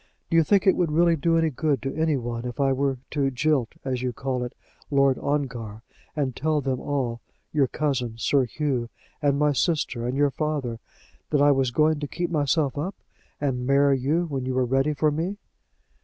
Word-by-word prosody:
Do - - +2
you 165 - +6
think 195 +4 +3
it 190 - +5
would 170 -4 +1
really 170 +2 +4
do 165 +2 +2
any 165 -1 +2
good 145 0 0
to 135 0 -2
any 160 -2 +1
one 120 -1 -4
if 125 +3 -6
I 135 -1 +3
were 135 0 0
to 140 -2 +1
jilt, 135 -1 0
as 130 -2 -1
you 125 -1 -1
call 130 +1 -3
it, 125 - -6 0.3
Lord 140 -2 +3
Ongar, 120 -7 -3 0.3
and 135 -5 -1
tell 155 +1 +1
them 135 -2 -1
all, 125 -5 -2 0.3
your 145 -3 +3
cousin, 130 -6 -1
Sir 135 +3 +2
Hugh, 125 -2 -2 0.3
and 140 -2 +2
my 150 0 +3
sister, 135 -5 0
and 125 +2 -2
your 145 0 +3
father, 140 -5 -2 0.5
that 150 - +2
I 145 0 +6
was 135 -2 +2
going 155 +4 +2
to 145 - -3
keep 175 +4 -3
myself 145 -2 +1
up, 180 +7 -3 0.4
and 125 -3 -1
marry 140 0 +4
you 155 +7 +1
when 140 -5 -3
you 130 0 -2
were 130 -1 +2
ready 135 +4 +1
for 150 +1 +2
me?" 170 +7 -2
140 Hz, 200 wpm, -25 LUFS, 130-155 Hz, 0.5 s, you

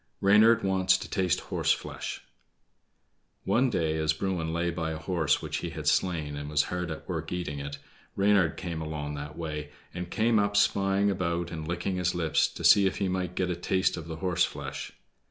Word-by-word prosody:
Reynard 110 +4 +5
Wants 95 -1 +3
to - - -7
Taste 95 -4 0
Horse - - 0
flesh - - -4 1.2
One 130 +2 +2
day 80 -7 0
as 80 0 +2
Bruin 85 -1 -2
lay 85 +1 0
by 80 -1 -3
a 80 - -3
horse 80 -2 0
which - - -3
he - - -4
had - - -7
slain, 80 -6 +1
and 75 0 -5
was 75 -1 +3
hard 90 -1 -2
at 80 - -7
work 80 -3 -4
eating 85 -5 -3
it, 70 0 -5 0.4
Reynard 100 -5 +3
came 85 -4 -4
along 75 -2 -4
that 75 +1 -7
way, 75 -3 -4 0.2
and 90 0 -5
came 110 +2 +2
up 100 0 +1
spying 100 0 +3
about 85 -2 -2
and 80 -1 -5
licking 90 +2 -2
his 90 -1 0
lips, 80 -3 +2
to - - -9
see 100 -2 +7
if 95 - -2
he 100 -2 0
might 90 -1 -2
get 90 -1 0
a - - -1
taste 95 +2 +1
of 85 -1 -7
the 80 - -5
horse 90 +1 +1
flesh. - - -4
85 Hz, 200 wpm, -28 LUFS, 80-95 Hz, 1.2 s, see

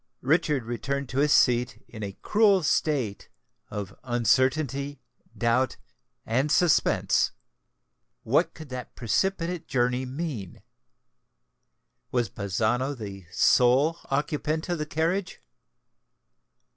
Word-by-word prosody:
Richard 150 -1 +2
returned 135 +3 -3
to 130 - -2
his 145 +1 +3
seat 125 -3 +3
in 115 -2 -10
a 100 -2 -6
cruel 205 -4 +4
state 135 -10 0 0.4
of 100 -2 -6
uncertainty, 130 +3 +1 0.4
doubt, 120 +2 +1 0.5
and 130 +6 0
suspense. 175 -1 +3 0.9
What 160 +8 +1
could 155 -3 -10
that 125 -1 -7
precipitate 175 - -1
journey 125 -1 0
mean? 130 - -5 1.5
was 120 -5 0
Bazzano 110 +8 -1
the 100 -5 -8
sole 130 - +4
occupant 150 +3 -1
of 175 -2 -1
the 150 - -3
carriage? 170 +5 -1
130 Hz, 100 wpm, -26 LUFS, 120-155 Hz, 1.5 s, cruel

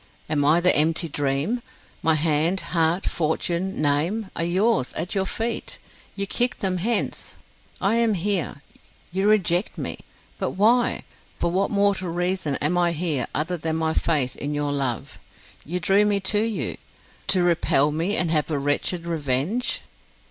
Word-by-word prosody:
Am 150 -2 +1
I 155 +4 +5
the 180 +1 +5
empty 160 +3 +3
dream? 145 - -1 0.4
My 160 -1 +4
hand, 160 +4 +1
heart, 165 +2 +2
fortune, 170 +4 -1
name, 170 +9 0
are - - -1
yours, 185 - +1
at 170 +4 -3
your 190 -2 0
feet; 230 +3 -3 0.4
you 200 - -1
kick 245 +5 0
them 185 -2 -1
hence. 220 +5 -1 0.4
I 210 +4 +2
am 230 -3 +2
here 180 -6 -2 0.5
you 190 +3 +1
reject 190 -2 +2
me. - - -4 0.4
But - - -2
why, 235 +4 +3 0.4
for 170 - 0
what 190 +3 +1
mortal 200 -3 +1
reason 175 -3 -1
am 165 +6 0
I 175 -1 +2
here 155 -6 -1
other 165 +5 -1
than 160 0 -2
my 160 0 0
faith 145 -8 +1
in 145 +1 -4
your 145 0 -1
love? 135 -5 -3 0.4
You 180 +4 -3
drew 195 +4 +3
me 205 -1 +2
to 205 - +3
you, 210 - -2 0.5
to 185 -2 +4
repel 155 -4 +3
me, 165 +7 0
and 175 -3 +1
have 155 -1 +1
a 150 - 0
wretched 145 +5 0
revenge." 165 - -1
170 Hz, 160 wpm, -24 LUFS, 150-195 Hz, 0.5 s, I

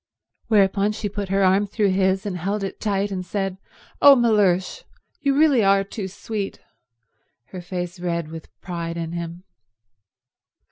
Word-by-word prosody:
Whereupon 205 -1 +3
she 210 0 -3
put 200 -1 -5
her 195 0 +2
arm 190 +2 +3
through 205 -1 +1
his 190 +1 +1
and 200 -3 -3
held 195 +4 -2
it 195 - -5
tight 200 -1 0
and 185 -1 -3
said, 195 +1 -3 0.4
"Oh, 280 -1 +9
Mellersh, 205 -7 +2 0.4
you 280 -1 +1
really 290 -7 +4
are 195 0 +4
too 195 0 -6
sweet!"—her 180 - -9
face 175 0 -5
red 170 -3 -2
with 160 -1 -9
pride 170 -2 -5
in 165 -1 -4
him. 170 +1 -6
195 Hz, 145 wpm, -23 LUFS, 175-205 Hz, 0.4 s, Oh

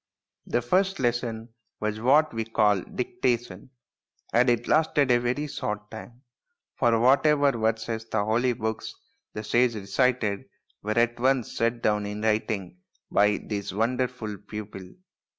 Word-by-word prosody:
The 120 - 0
first 190 +9 +1
lesson 120 -2 -1 0.3
was 110 0 -3
what 145 +5 +4
we 115 0 -2
call 105 -3 +2
dicta 125 - -1
tion, 110 -2 -13 0.6
and 125 +2 +4
it 120 0 +1
lasted 150 -3 +3
a 120 - +5
very 125 +5 -1
short 105 -7 -5
time, 120 +3 -11 0.5
for 115 -3 +2
whatever 140 +3 +4
verses 115 -1 -2
from - - -32
the - - -2
holy 120 +3 +2
books 110 -1 -4 0.4
the 105 - -4
sage 120 +1 +2
recited 110 0 0 0.4
were 110 +2 -2
at 120 0 +2
once 130 -1 +1
set 115 +1 0
down 105 -1 +1
in 105 +1 -5
writing 105 -4 -1 0.3
by 105 0 +3
this 100 -3 -3
wonderful 115 -1 -2
pupil. 105 -3 -8
115 Hz, 145 wpm, -26 LUFS, 105-125 Hz, 0.6 s, a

